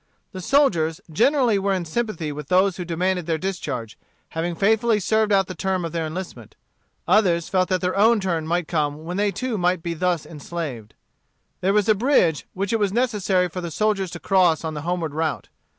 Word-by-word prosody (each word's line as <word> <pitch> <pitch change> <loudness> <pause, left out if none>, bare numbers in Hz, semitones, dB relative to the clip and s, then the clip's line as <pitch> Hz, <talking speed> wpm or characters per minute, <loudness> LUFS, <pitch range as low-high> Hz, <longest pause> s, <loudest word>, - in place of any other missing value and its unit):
The 185 -3 -7
soldiers 175 - +2
generally 240 - +3
were 195 0 +1
in 180 -2 -3
sympathy 170 -4 -2
with 145 -1 -7
those 185 +2 +3
who 180 - -4
demanded 180 +1 -1
their 165 -1 +1
discharge, 150 - -4 0.3
having 165 +1 -3
faithfully 220 +3 +2
served 215 +2 +1
out 195 -1 +4
the 185 - -7
term 190 -2 -1
of 165 - -4
their 165 -1 -2
enlistment. 180 +4 -7 0.5
Others 175 -6 +3
felt 185 -1 +1
that 185 -1 +1
their 180 0 -1
own 220 +3 +4
turn 170 -5 -2
might 175 0 0
come 150 -2 -1
when 175 +3 -4
they 205 0 +2
too 220 +3 -3
might 180 -1 +1
be 170 - -2
thus 175 -1 -1
enslaved. 145 -8 -6 0.6
There 185 - 0
was 210 0 +2
a 215 - +6
bridge 200 - +2
which 195 +3 -2
it 225 - +2
was 205 -2 +1
necessary 205 -6 +1
for 180 +2 -6
the 170 - -4
soldiers 195 +1 0
to 170 - -6
cross 180 -5 +3
on 160 -1 -3
the 150 - -5
homeward 170 -2 -2
route. 160 -1 -2
180 Hz, 200 wpm, -23 LUFS, 165-205 Hz, 0.6 s, a